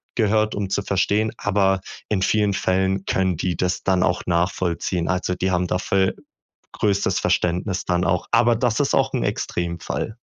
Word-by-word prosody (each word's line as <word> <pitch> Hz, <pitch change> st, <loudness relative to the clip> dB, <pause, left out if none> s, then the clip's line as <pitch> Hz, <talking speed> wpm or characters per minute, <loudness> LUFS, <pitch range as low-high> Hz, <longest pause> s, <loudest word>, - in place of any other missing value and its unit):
gehört, 110 Hz, -1 st, +2 dB
um 100 Hz, -2 st, -3 dB
zu 100 Hz, -, 0 dB
verstehen, 105 Hz, +3 st, 0 dB
aber 95 Hz, -2 st, +1 dB, 0.3 s
in 100 Hz, -3 st, 0 dB
vielen 105 Hz, +1 st, +2 dB
Fällen 95 Hz, 0 st, 0 dB
können 95 Hz, -2 st, +1 dB
die 85 Hz, 0 st, -2 dB
das 90 Hz, 0 st, -1 dB
dann 95 Hz, -2 st, +2 dB
auch 90 Hz, 0 st, 0 dB
nachvollziehen. 85 Hz, 0 st, 0 dB
Also 90 Hz, 0 st, -1 dB
die 95 Hz, +1 st, -1 dB
haben 90 Hz, 0 st, +1 dB
dafür 95 Hz, +1 st, +1 dB, 0.6 s
größtes 100 Hz, -2 st, +1 dB
Verständnis 90 Hz, +2 st, 0 dB
dann 90 Hz, 0 st, 0 dB
auch. 90 Hz, 0 st, 0 dB
Aber 120 Hz, 0 st, +4 dB
das 120 Hz, 0 st, 0 dB
ist 140 Hz, -, +1 dB
auch -, -, +2 dB
'n -, -, 0 dB
Extremfall. 85 Hz, +5 st, -3 dB
95 Hz, 165 wpm, -22 LUFS, 90-105 Hz, 0.6 s, Aber